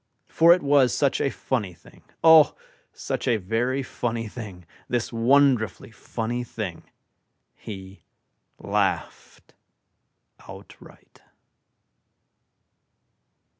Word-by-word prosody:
For 165 +1 +5
it 175 -1 +4
was 140 -3 +3
such 140 -2 +1
a - - +1
funny 105 -10 -3
thing, - - -20 0.2
O, 160 -2 +7 0.4
such - - -5
a 120 - +3
very 120 +7 -1
funny 115 -3 -4
thing, 105 -6 -9 0.2
This 120 -1 -2
wonderfully 115 -3 +2
funny 120 +2 -4
thing, 110 -7 -7 0.7
He 95 -2 -10 0.6
Laughed - - -3 1.0
Outright. - - -15
120 Hz, 90 wpm, -24 LUFS, 110-135 Hz, 1.0 s, O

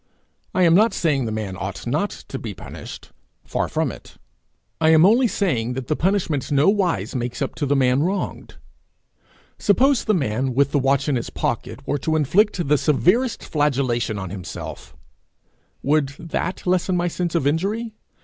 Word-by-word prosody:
I 185 - +4
am 165 -1 +5
not 215 +6 +4
saying 140 -6 +1
the 110 - -3
man 105 -3 -4
ought - - -6
not - - 0
to - - -8
be - - -6
punished - - -10 0.3
far - - -2
from - - -1
it; - - -13 0.6
I 160 -1 +4
am 160 +1 +6
only 235 +5 +5
saying 125 - -1
that 130 -1 -6
the 155 - +2
punishment 170 -7 0
nowise 175 +5 +2
makes 120 -2 -3
up 135 - -2
to 145 - -1
the 145 - +2
man 130 0 +3
wronged. 190 +5 -3 1.0
Suppose 260 +6 +3
the 215 - +2
man, 130 -3 -1
with 140 +1 +3
the 145 - +2
watch 135 +1 +1
in 140 -3 +1
his 120 - -4
pocket, - - -3
were 145 - 0
to 160 +3 -1
inflict 175 - +2
the 150 0 +3
severest 190 - +2
flagellation 130 -7 0
on 95 -2 -5
himself: 95 -2 -8 0.9
would 150 0 +2
that 170 +3 -4
lessen 180 0 +1
my 175 0 +1
sense 175 0 -2
of 165 - +1
injury? 205 +10 -1
155 Hz, 170 wpm, -22 LUFS, 130-185 Hz, 1.0 s, am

